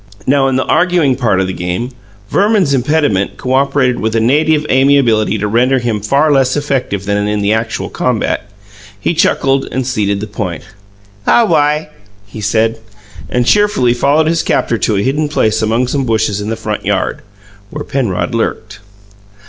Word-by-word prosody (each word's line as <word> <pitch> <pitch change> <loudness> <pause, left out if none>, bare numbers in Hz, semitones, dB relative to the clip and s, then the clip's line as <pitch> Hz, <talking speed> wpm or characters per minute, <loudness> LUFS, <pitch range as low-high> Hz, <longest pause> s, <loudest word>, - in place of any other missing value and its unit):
Now, 135 0 +2
in 135 - 0
the 130 - 0
arguing 165 -5 +2
part 115 -7 +1
of 95 - +1
the 95 - -4
game, 90 +9 -3 0.4
Verman's 200 -7 +2
impediment 135 -7 0
cooperated 130 -1 +1
with 110 +1 -2
a - - +3
native 150 +6 +2
amiability 130 -6 +3
to 105 +1 -2
render 125 +5 +2
him 120 -4 -2
far 140 +8 +2
less 135 -1 +2
effective 130 -9 -2
than 105 0 0
in 105 0 -1
the 100 +2 +2
actual 110 +1 -2
combat. - - -2 0.5
He - - -1
chuckled, 135 0 +1
and 130 -1 -2
ceded 105 -6 -1
the 105 - -4
point. 100 -6 -5 0.6
"Aw - - +5
wi," 150 -5 +1 0.4
he 100 +2 -9
said, 110 +2 0 0.5
and 125 0 0
cheerfully 205 -11 +3
followed 140 +6 +2
his 165 0 +1
captor 115 -6 0
to 110 - 0
a 100 - 0
hidden 150 +3 0
place 110 -6 +1
among 115 +3 +1
some 135 +2 -1
bushes 110 -3 0
in 105 - -4
the 115 - -1
front 105 -2 -4
yard, - - -1 0.5
where 150 +4 -6
Penrod 125 -3 -2
lurked. 110 -3 -3
125 Hz, 170 wpm, -14 LUFS, 110-140 Hz, 0.6 s, Aw